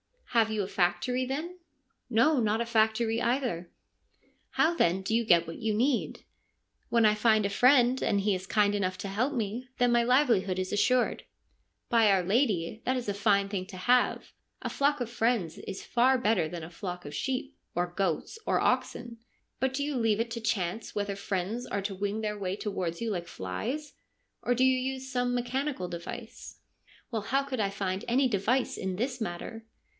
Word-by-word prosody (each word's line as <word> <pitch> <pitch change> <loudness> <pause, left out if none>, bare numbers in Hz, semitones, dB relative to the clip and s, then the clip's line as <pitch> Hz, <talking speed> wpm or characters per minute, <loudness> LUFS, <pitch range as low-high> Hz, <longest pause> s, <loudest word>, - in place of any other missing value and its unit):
1 230 -2 +5
Have - - -8
you 215 -2 0
a - - -4
factory, 185 +8 0
then? 320 +8 -4
' 275 -2 -46
' - - -51
No, 255 +5 +4
not 220 0 +1
a - - 0
factory 225 0 +2
either.' 235 -9 -1 0.4
' - - -42 0.3
How 325 +2 +3
then 190 - +2
do 195 +3 -3
you 235 +1 +3
get 170 -5 +5
what 165 - -7
you 220 -2 -1
need? 245 +4 0 0.2
' - - -46
' - - -45
When 230 -1 +4
I 210 - +6
find 215 -1 +3
a - - +1
friend, 250 +3 +4
and 200 -2 +1
he 205 0 +2
is 185 0 -4
kind 205 -1 +3
enough 185 -2 -1
to 200 - -4
help 245 +9 0
me, 235 +1 -3
then 245 -1 +3
my 240 0 +4
livelihood 235 -7 +3
is 185 0 -2
assured.' 250 +4 +2 0.3
' - - -48
By 230 -3 +5
our 190 -2 +3
lady, 210 -2 +1
that 260 - +1
is 240 -4 -3
a - - 0
fine 200 -1 +2
thing 190 -2 -3
to 195 -2 -9
have. 245 +7 +2 0.3
A - - -2
flock 285 0 +1
of 240 - -2
friends 225 -8 0
is 190 - -7
far 255 +2 +3
better 225 -9 +2
than 170 0 -6
a 160 - -8
flock 180 -1 -6
of 145 - -7
sheep, 270 +1 -3 0.2
or 175 0 0
goats, 190 - -2
or - - +2
oxen. 240 -1 -1 0.4
But 265 0 0
do 280 +2 -1
you 290 -2 -2
leave 225 -2 +2
it 230 0 -3
to 230 0 -4
chance 220 -2 -2
whether 200 -1 -2
friends 200 +4 -3
are 200 - -2
to 200 0 -2
wing 205 +3 -2
their 210 -1 -3
way 190 -1 -2
towards 185 -5 -3
you 230 -1 -1
like 175 -3 -3
flies, 240 - -4 0.5
or 245 - +1
do 255 - +2
you 260 0 +4
use 265 0 -4
some 245 -1 0
mechanical 255 -4 -2
device? 170 -1 -8 0.2
' - - -29
1 225 -2 -1
Why, 205 - -11
how 275 +2 +2
could 270 -3 -4
I 200 -2 +1
find 195 -1 -3
any 260 +3 +3
device 235 +5 0
in 190 -1 -3
this 250 +5 -2
matter 220 +3 -5
220 Hz, 210 wpm, -29 LUFS, 195-250 Hz, 0.5 s, I